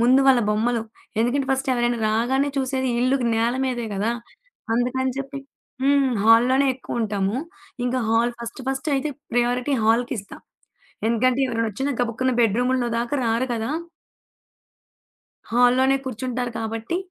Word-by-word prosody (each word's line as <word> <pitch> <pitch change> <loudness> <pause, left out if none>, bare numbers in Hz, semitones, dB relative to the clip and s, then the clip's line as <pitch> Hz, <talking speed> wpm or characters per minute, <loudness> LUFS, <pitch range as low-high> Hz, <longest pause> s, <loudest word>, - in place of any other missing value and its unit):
ముందు 255 +3 +5
వాళ్ల 260 -3 +6
బొమ్మలు. 225 +2 +1 0.4
ఎందుకంటే 260 +4 +1
ఫస్ట్ 270 0 0
ఎవరైనా 240 -1 0
రాగానే 255 +6 +1
చూసేది 260 -1 -1
ఇల్లుకి 255 0 +2
నేలమీదే 240 +1 0
గదా! 215 +4 0 0.6
అందుకని 255 +2 0
చెప్పి 275 +1 -5 0.4
హ్మ్. 275 -1 +3
హాల్‌లోనే 250 +5 +5
ఎక్కువ 245 -2 -5
ఉంటాము. 205 0 -1 0.5
ఇంకా 250 +1 0
హాల్ 230 +2 +2 0.3
ఫస్ట్ 270 +3 -2
అయితే 295 +2 -1 0.2
ప్రయారిటీ 245 +3 +1
హాల్‌కిస్తా 230 -2 0 0.7
ఎందుకంటే 245 +3 +2
ఎవరైనా 230 -2 -1
ఒచ్చినా 270 +7 -2
గబుక్కున 245 +2 0
బెడ్‌రూముల్లో 245 +3 +2
దాకా 240 +5 -1
రారు 230 +3 +1
కదా! 225 +2 -2 1.8
హాల్‌లోనే 250 +3 +4
కూర్చుంటారు 250 0 -3
కాబట్టి, 225 +8 -3
245 Hz, 120 wpm, -23 LUFS, 230-265 Hz, 1.8 s, వాళ్ల